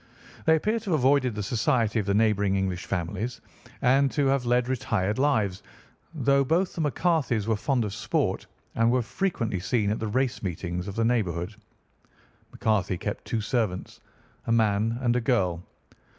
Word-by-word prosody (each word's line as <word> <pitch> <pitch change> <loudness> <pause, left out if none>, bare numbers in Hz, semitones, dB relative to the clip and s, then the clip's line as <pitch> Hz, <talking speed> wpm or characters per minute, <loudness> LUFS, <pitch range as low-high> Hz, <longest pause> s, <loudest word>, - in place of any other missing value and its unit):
They 160 - +6
appear 215 +8 0
to 215 -2 -7
have 160 -4 +2
avoided 130 -2 +3
the 105 - -3
society 115 +1 +1
of 105 - -3
the 100 - +2
neighbouring 105 -2 +2
English 95 -2 -2
families 95 +7 -3 0.4
and 135 +2 +4
to 145 - +1
have 135 -2 +1
led 125 0 +2
retired 110 -4 -1
lives, 110 -9 +1 0.5
though 140 -1 +3
both 170 +7 +1
the 165 - -3
McCarthys 150 - +1
were 110 0 +1
fond 125 +2 0
of 100 - -4
sport 110 - -1 0.3
and 115 0 +2
were 125 -1 +2
frequently 115 - -2
seen 105 +2 0
at 110 - -2
the 110 - -2
race 130 +4 0
meetings 90 0 -4
of 100 - -6
the 115 0 +1
neighbourhood. 100 -5 0 1.0
McCarthy 100 -4 0
kept - - -5
two 115 - -2
servants—a 110 0 -4
man 110 0 +2
and 120 -1 +2
a 125 - +1
girl. 95 -8 +1
115 Hz, 165 wpm, -26 LUFS, 100-130 Hz, 1.0 s, They